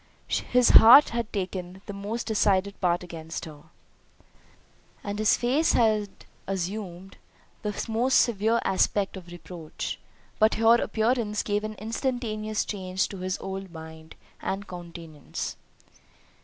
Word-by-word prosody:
His 250 -1 +2
heart 245 +6 +9
had 235 -2 -3
taken 185 -1 -5
the 205 - -6
most 205 +4 -4
decided 200 -3 +2
part 175 -1 +1
against 165 -2 -7
her, 150 -1 -12 1.4
and 205 +1 -4
his 215 - +4
face 270 +7 +2
had 215 -3 +2 0.4
assumed 190 0 -5 0.4
the 210 -1 -3
most 235 +4 +1
severe 225 0 +2
aspect 195 +1 +1
of 185 -2 -10
reproach; 170 -2 -7 0.4
but 215 +1 +4
her 225 +1 +5
appearance 220 -2 0
gave 205 0 -1
an 215 0 -5
instantaneous 215 -1 -2
change 190 -2 -2
to 195 - -7
his 185 +1 -2
whole 195 0 -6
mind, 160 -1 -11 0.3
and 195 +1 -3
countenance. 170 -4 -7
200 Hz, 125 wpm, -26 LUFS, 180-220 Hz, 1.4 s, heart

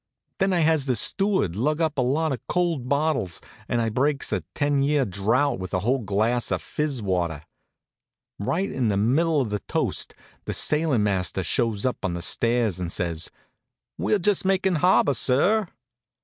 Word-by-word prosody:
Then 195 0 +2
I 175 -2 +2
has 155 -3 +2
the 130 - +2
steward 190 - +2
lug 150 +9 0
up 155 -3 0
a - - +4
lot 145 +5 +1
of 130 - -2
cold 170 -8 -1
bottles 140 - 0 0.3
and 120 - +1
I 115 -1 0
breaks 140 +5 0
a - - 0
ten 145 -1 +1
year 140 -1 +2
drouth 110 +7 0
with 95 0 -4
a 95 - 0
whole 125 +6 +1
glass 110 +3 0
of - - 0
fizz 145 -6 -3
water. 85 -5 -1 1.0
Right 180 - -1
in 125 -3 -1
the 100 -2 +1
middle 145 +9 +2
of 115 -5 -3
the 105 - -1
toast - - -1 0.3
the - - -2
sailin' 150 -7 +2
master 95 -2 0
shows 115 -3 0
up 125 - -2
on 90 -3 -1
the 85 - -5
stairs 115 0 +1
and 90 -2 -3
says: 85 -3 -2 0.7
"We're 210 - +1
just 200 +1 +1
makin' 190 0 +1
the 160 - 0
harbor, 180 -4 +4
sir." 180 - +2
130 Hz, 180 wpm, -24 LUFS, 105-155 Hz, 1.0 s, a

